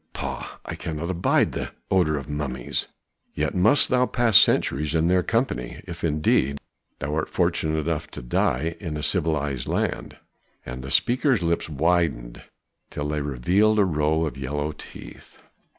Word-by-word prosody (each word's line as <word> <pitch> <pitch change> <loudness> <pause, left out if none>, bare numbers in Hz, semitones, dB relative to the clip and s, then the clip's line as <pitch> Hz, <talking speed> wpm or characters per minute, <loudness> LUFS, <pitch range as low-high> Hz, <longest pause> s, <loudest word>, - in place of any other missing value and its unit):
Pah! - - -5
I - - -5
cannot 80 +2 -4
abide 90 -1 +2
the - - -5 0.2
odor 85 -5 +3
of 70 - -6
mummies." 70 -4 -3 0.5
"Yet - - -1
must 110 +10 +4
thou 125 -1 +3
pass 120 -4 +1
centuries 75 -1 +4
in 80 +1 +2
their 90 0 +4
company, 115 - -2
if 85 -1 -8
indeed 75 -3 +2 0.4
thou 70 +2 -4
art 80 0 -1
fortunate 80 0 0
enough 80 -2 -2
to - - -6
die 75 +6 0
in 80 -6 -4
a 75 - -5
civilized 75 -6 0
land." - - -2 0.5
And 65 +1 -6
the 65 - -7
speaker's 125 - +2
lips 85 -1 0
widened 75 -6 0 0.5
till 75 0 -4
they 75 0 -1
revealed 90 - +2
a 105 - +5
row 80 -1 +1
of 70 -3 -5
yellow 75 +3 -2
teeth. - - -12
80 Hz, 155 wpm, -24 LUFS, 70-90 Hz, 0.5 s, a